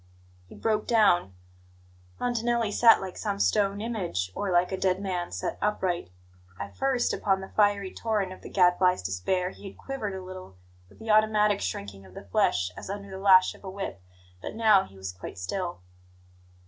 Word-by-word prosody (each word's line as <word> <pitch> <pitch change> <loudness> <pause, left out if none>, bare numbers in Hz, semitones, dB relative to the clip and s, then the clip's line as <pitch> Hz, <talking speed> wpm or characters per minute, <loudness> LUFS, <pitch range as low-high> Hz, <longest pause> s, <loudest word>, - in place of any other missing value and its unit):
He - - -13
broke 215 -1 -1
down. 180 - +3 0.8
Montanelli 235 -2 0
sat 230 +1 +6
like 190 -1 -6
some 205 -2 -2
stone 200 0 +1
image, 180 - -3
or 200 - -3
like 175 +1 +3
a - - 0
dead 185 -1 +1
man 185 -3 -3
set 90 +2 -4
upright. 190 - -1 0.5
At 100 0 -7
first, 265 -2 +1
under 190 -1 +1
the - - -18
fiery 205 -2 +2
torrent 210 -5 -1
of - - -14
the - - -9
Gadfly's 180 - +3
despair, 140 - -1
he 200 - -11
had - - -17
quivered 220 -8 -5
a 190 - -6
little, 185 - -10 0.3
with - - -20
the 220 -1 -3
automatic 210 -1 +3
shrinking 95 +1 -5
of 95 -1 -16
the - - -8
flesh, 90 -1 +1
as - - -9
under 200 0 -6
the 190 - -6
lash 190 -1 +6
of - - -18
a 190 - -6
whip; 190 - -6 0.4
but - - -6
now 215 -4 +5
he 95 - -17
was 95 -1 -5
quite 90 - -9
still. 175 - -4
190 Hz, 185 wpm, -27 LUFS, 175-210 Hz, 0.8 s, sat